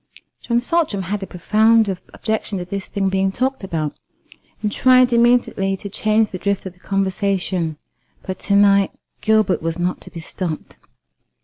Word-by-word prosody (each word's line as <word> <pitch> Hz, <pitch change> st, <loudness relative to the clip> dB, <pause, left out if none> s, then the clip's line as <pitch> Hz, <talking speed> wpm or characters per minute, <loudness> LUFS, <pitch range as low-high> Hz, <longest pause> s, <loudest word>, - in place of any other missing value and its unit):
John 235 Hz, -1 st, +1 dB
Saltram 255 Hz, -, 0 dB
had 200 Hz, +3 st, -3 dB
a 195 Hz, -, -5 dB
profound 220 Hz, +5 st, +3 dB, 0.2 s
objection 220 Hz, -2 st, -2 dB
to 180 Hz, -, -4 dB
this 195 Hz, +2 st, -5 dB
thing 195 Hz, -1 st, -1 dB
being 190 Hz, 0 st, +1 dB
talked 260 Hz, +3 st, -1 dB
about, 155 Hz, -5 st, -3 dB, 0.7 s
and 210 Hz, -, 0 dB
tried 255 Hz, 0 st, +4 dB
immediately 235 Hz, -5 st, +2 dB
to 200 Hz, 0 st, -8 dB
change 215 Hz, +1 st, +1 dB
the 185 Hz, -, -5 dB
drift 200 Hz, 0 st, -1 dB
of 190 Hz, -, -6 dB
the 180 Hz, -, -27 dB
conversation; 190 Hz, -4 st, -1 dB, 0.5 s
but 185 Hz, -1 st, -5 dB
to 200 Hz, -, +1 dB
night 200 Hz, -1 st, +5 dB, 0.3 s
Gilbert 215 Hz, -3 st, +2 dB
was 165 Hz, +1 st, -2 dB
not 175 Hz, +1 st, -2 dB
to -, -, -10 dB
be 170 Hz, -, -9 dB
stopped. 165 Hz, 0 st, -5 dB
200 Hz, 165 wpm, -20 LUFS, 185-220 Hz, 0.7 s, night